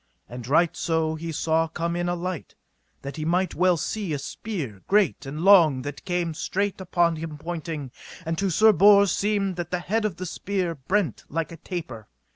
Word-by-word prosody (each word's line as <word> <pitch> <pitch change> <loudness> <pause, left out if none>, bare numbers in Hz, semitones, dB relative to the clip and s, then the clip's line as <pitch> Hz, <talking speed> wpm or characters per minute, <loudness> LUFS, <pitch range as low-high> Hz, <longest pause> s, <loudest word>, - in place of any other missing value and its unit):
And 120 -1 -8
right 160 +5 +3
so 160 -1 0
he 165 +1 -5
saw 160 +1 +1
come 170 +1 -3
in 175 0 -1
a 175 - 0
light, 175 -2 -5 0.5
that 140 +2 -6
he 155 - -3
might 180 +4 +1
well 180 -1 +3
see 195 +1 -3
a - - 0
spear 140 - -6
great 195 -8 +2
and 150 +3 -5
long 170 -9 +6
that 145 0 -7
came 175 -2 -1
straight 195 +4 -2
upon 175 -2 +1
him 155 -1 -6
pointling, 160 -4 -5 0.3
and 165 +1 -1
to 195 0 +1
Sir 220 +5 +6
Bors 200 +2 +6
seemed 200 -3 0
that 175 -1 -4
the 180 - -1
head 210 +6 -1
of 210 -5 -1
the 185 - -6
spear 185 0 -2
brent 165 - -1
like 165 +2 -2
a 165 - -9
taper. 150 - -7
170 Hz, 195 wpm, -25 LUFS, 155-190 Hz, 0.5 s, long